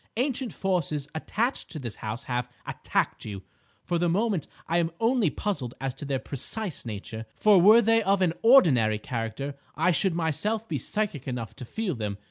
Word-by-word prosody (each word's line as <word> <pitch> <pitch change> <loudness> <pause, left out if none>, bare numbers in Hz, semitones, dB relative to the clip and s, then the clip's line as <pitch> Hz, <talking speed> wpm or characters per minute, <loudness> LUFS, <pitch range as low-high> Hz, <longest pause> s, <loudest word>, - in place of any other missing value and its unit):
Ancient 255 -2 -1
forces 160 -8 -1
attached 225 +10 -1
to - - -7
this 120 -7 -5
house 110 +4 -5
have 125 -1 -2 0.2
attacked - - -1
you. 100 -3 -6 0.4
For 175 - 0
the 175 0 +2
moment 195 -2 0 0.2
I 170 +1 +2
am 165 -1 +1
only 230 -5 +3
puzzled 145 - -3
as 135 -1 -2
to 145 +3 -7
their 135 -1 0
precise 140 - -2
nature; 110 +1 -6
for 205 -4 +5
were 220 +5 +8
they 225 +1 +4
of 195 -2 +2
an 170 -3 +2
ordinary 135 - +6
character, 115 +5 -4 0.2
I 185 - +3
should 180 +1 +1
myself 205 +7 -1
be - - -2
psychic 205 - -2
enough 120 -5 -4
to 130 - -7
feel 220 - -2
them. 105 -5 -4
165 Hz, 180 wpm, -27 LUFS, -, 0.4 s, were